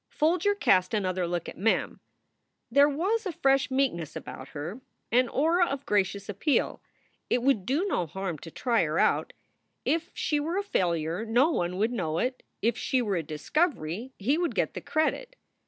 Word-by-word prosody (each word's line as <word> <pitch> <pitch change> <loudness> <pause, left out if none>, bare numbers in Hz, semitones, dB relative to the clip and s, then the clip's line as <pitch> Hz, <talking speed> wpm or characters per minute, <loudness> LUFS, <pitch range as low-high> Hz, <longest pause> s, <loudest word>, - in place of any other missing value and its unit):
Folger 360 +6 +2
cast 185 - +3
another 185 -3 0
look 175 -1 -2
at - - -9
Mem. 220 +4 +1 0.7
There 280 +3 +6
was 390 +9 0
a - - -1
fresh 270 -3 +2
meekness 250 - 0
about 130 - -7
her, 160 - -6 0.3
an 245 +1 +4
aura 340 +5 +3
of 275 0 -4
gracious 200 0 0
appeal. 210 - 0 0.5
It 245 - +1
would 255 -8 +2
do 290 +9 +1
no 180 - 0
harm 185 -1 -4
to 165 - -9
try 235 +5 +1
her 155 0 -1
out. - - +2 0.5
If 330 +1 0
she 300 -2 0
were 325 +5 -2
a 400 - 0
failure 170 - 0
no 240 +8 +3
one 180 - -1
would 220 +4 +1
know 165 -9 -2
it. 255 +6 -1 0.2
If 230 +1 +1
she 260 - +1
were 205 -4 0
a 170 - 0
discovery, 200 - -1
he 270 - +1
would 350 -1 -1
get - - 0
the - - -6
credit. - - -1
235 Hz, 180 wpm, -28 LUFS, 180-300 Hz, 0.7 s, There